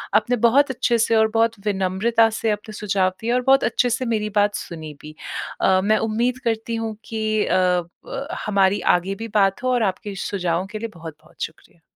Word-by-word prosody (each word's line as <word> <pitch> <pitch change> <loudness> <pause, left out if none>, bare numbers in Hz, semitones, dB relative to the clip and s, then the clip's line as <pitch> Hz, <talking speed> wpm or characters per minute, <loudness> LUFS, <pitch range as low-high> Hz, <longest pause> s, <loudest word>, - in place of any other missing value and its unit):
आपने 220 +4 +3
बहुत 280 +5 +4
अच्छे 240 -1 +1
से 230 0 +2
और 220 0 +5
बहुत 230 -1 +1
विनम्रता 210 +4 +2
से 225 - +1
अपने 210 +1 -5
सुझाव 200 -3 +1
दिए 230 +1 -1
और 250 - +2
बहुत 270 0 +5
अच्छे 245 +2 +1
से 255 +2 -1
मेरी 215 -3 -1
बात 205 0 +2
सुनी 160 -3 -7
भी। 155 0 -11 0.5
अ, 190 0 +4
मैं 215 +2 +3
उम्मीद 240 +3 0
करती 225 0 -1
हूँ 225 -1 -3
कि 215 -1 -1
अ 180 -1 +2 0.2
ब 280 - -5 0.2
हमारी 200 -1 +2
आगे 180 +2 0
भी 225 +3 -6
बात 195 0 +3
हो 255 - +1
और 245 -2 +2
आपके 200 +1 -2
सुझावों 180 -2 -2
के 215 - -5
लिए 230 - -3
बहुत-बहुत 160 -2 -12
शुक्रिया। 165 +1 -9
215 Hz, 195 wpm, -22 LUFS, 190-230 Hz, 0.5 s, और